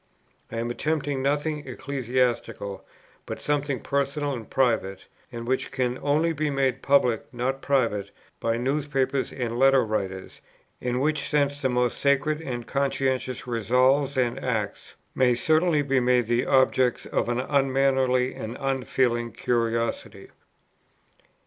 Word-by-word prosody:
I 115 Hz, -, -4 dB
am 120 Hz, +1 st, -2 dB
attempting 145 Hz, 0 st, -1 dB
nothing 150 Hz, +2 st, -1 dB
ecclesiastical, 125 Hz, -6 st, -2 dB, 0.4 s
but -, -, -5 dB
something 145 Hz, -3 st, -1 dB
personal 140 Hz, +1 st, -1 dB
and 115 Hz, -4 st, -7 dB
private, 115 Hz, -7 st, 0 dB, 0.3 s
and 115 Hz, 0 st, -6 dB
which 130 Hz, +1 st, 0 dB
can 125 Hz, -1 st, -1 dB
only 155 Hz, +4 st, +2 dB
be 155 Hz, 0 st, -1 dB
made 135 Hz, -2 st, 0 dB
public, 125 Hz, -5 st, +2 dB
not 130 Hz, +2 st, -2 dB
private, 115 Hz, -8 st, 0 dB, 0.3 s
by 115 Hz, 0 st, 0 dB
newspapers 135 Hz, 0 st, -1 dB
and 120 Hz, -2 st, -3 dB
letter 135 Hz, -2 st, +5 dB
writers, 95 Hz, -3 st, -4 dB, 0.4 s
in 125 Hz, 0 st, -1 dB
which 150 Hz, +1 st, 0 dB
sense 145 Hz, -1 st, +1 dB
the 130 Hz, -, +1 dB
most 125 Hz, -1 st, 0 dB
sacred 145 Hz, +2 st, +1 dB
and 120 Hz, -6 st, -5 dB
conscientious 130 Hz, -1 st, -1 dB
resolves 130 Hz, +4 st, +2 dB
and 120 Hz, -2 st, 0 dB
acts 110 Hz, -5 st, -3 dB, 0.2 s
may 125 Hz, -2 st, +3 dB
certainly 155 Hz, +3 st, +2 dB
be 135 Hz, -1 st, +2 dB
made 125 Hz, -1 st, +3 dB
the 120 Hz, +2 st, 0 dB
objects 130 Hz, -2 st, +3 dB
of -, -, -1 dB
an 120 Hz, 0 st, 0 dB
unmannerly 135 Hz, -2 st, +2 dB
and 115 Hz, +2 st, -6 dB
unfeeling 130 Hz, -3 st, 0 dB
curiosity." 115 Hz, 0 st, -2 dB
130 Hz, 130 wpm, -25 LUFS, 120-140 Hz, 0.4 s, letter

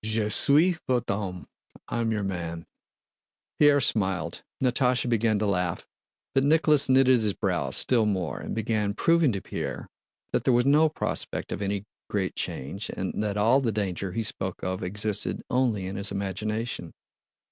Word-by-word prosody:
Je 110 Hz, -1 st, 0 dB
suis 155 Hz, -, +4 dB
vot'e 125 Hz, -2 st, +1 dB
homme!" 90 Hz, -6 st, -5 dB, 0.4 s
"I'm 115 Hz, -1 st, -1 dB
your 105 Hz, -2 st, -1 dB
man." 85 Hz, -3 st, -4 dB, 0.9 s
Pierre 145 Hz, -1 st, +6 dB
smiled, 95 Hz, -, 0 dB, 0.2 s
Natásha 125 Hz, -1 st, +1 dB
began 115 Hz, -2 st, +2 dB
to 105 Hz, -, 0 dB
laugh, 90 Hz, -3 st, -1 dB, 0.5 s
but 135 Hz, -, +3 dB
Nicholas 150 Hz, -1 st, +3 dB
knitted 130 Hz, -1 st, +5 dB
his 105 Hz, -2 st, +1 dB
brows -, -, -1 dB
still 115 Hz, -4 st, +3 dB
more 95 Hz, -5 st, -2 dB
and -, -, -5 dB
began 110 Hz, -2 st, -1 dB
proving 165 Hz, -4 st, +3 dB
to 100 Hz, -3 st, -3 dB
Pierre -, -, -5 dB, 0.5 s
that -, -, +1 dB
there 130 Hz, -, +3 dB
was 120 Hz, +1 st, +3 dB
no 150 Hz, +3 st, +5 dB
prospect 155 Hz, -, -3 dB
of -, -, -4 dB
any 100 Hz, 0 st, -2 dB, 0.2 s
great 95 Hz, -3 st, -1 dB
change 75 Hz, +10 st, -4 dB
and 95 Hz, +2 st, -3 dB
that 105 Hz, -1 st, -2 dB
all 115 Hz, +6 st, +4 dB
the 120 Hz, -4 st, 0 dB
danger 95 Hz, -3 st, -2 dB
he 115 Hz, -, -1 dB
spoke 95 Hz, -3 st, -4 dB
of 95 Hz, 0 st, -2 dB
existed 100 Hz, +3 st, -1 dB
only 120 Hz, -7 st, +1 dB
in 95 Hz, +1 st, -5 dB
his 100 Hz, 0 st, -1 dB
imagination. 105 Hz, 0 st, -3 dB
105 Hz, 160 wpm, -26 LUFS, 95-125 Hz, 0.9 s, Pierre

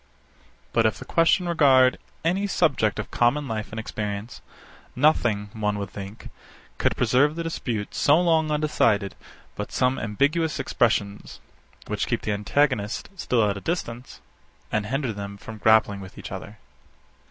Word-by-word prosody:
But 115 Hz, -1 st, +4 dB
if 110 Hz, -, -2 dB
the -, -, -9 dB
question 170 Hz, +2 st, +3 dB
regard 135 Hz, -6 st, +4 dB, 0.3 s
any 190 Hz, +5 st, +1 dB
subject 140 Hz, -, +1 dB
of 110 Hz, -, -5 dB
common 135 Hz, +5 st, +2 dB
life 110 Hz, -2 st, -4 dB
and 110 Hz, -, -6 dB
experience, 105 Hz, 0 st, -5 dB, 0.5 s
nothing, 120 Hz, -8 st, +2 dB
one 105 Hz, -1 st, -1 dB
would 100 Hz, -1 st, -5 dB
think, 100 Hz, +2 st, -9 dB, 0.5 s
could -, -, +1 dB
preserve 145 Hz, +4 st, +3 dB
the 165 Hz, -, -3 dB
dispute 120 Hz, -10 st, -3 dB
so 145 Hz, +3 st, +4 dB
long 165 Hz, -3 st, +2 dB
undecided 115 Hz, -10 st, +1 dB, 0.4 s
but -, -, -5 dB
some 130 Hz, +1 st, +1 dB
ambiguous 145 Hz, +9 st, 0 dB
expressions, 105 Hz, -6 st, -1 dB, 0.5 s
which -, -, -2 dB
keep -, -, -1 dB
the 110 Hz, -, -1 dB
antagonists 105 Hz, +1 st, 0 dB, 0.2 s
still 115 Hz, -4 st, +2 dB
at 100 Hz, -1 st, -1 dB
a -, -, -7 dB
distance, 125 Hz, -8 st, -4 dB, 0.5 s
and 105 Hz, -1 st, -1 dB
hinder 130 Hz, -1 st, -1 dB
them 100 Hz, 0 st, -7 dB
from 110 Hz, +1 st, -10 dB
grappling 110 Hz, -2 st, +4 dB
with 95 Hz, -1 st, -11 dB
each -, -, -8 dB
other. -, -, -8 dB
115 Hz, 150 wpm, -25 LUFS, 105-150 Hz, 0.5 s, But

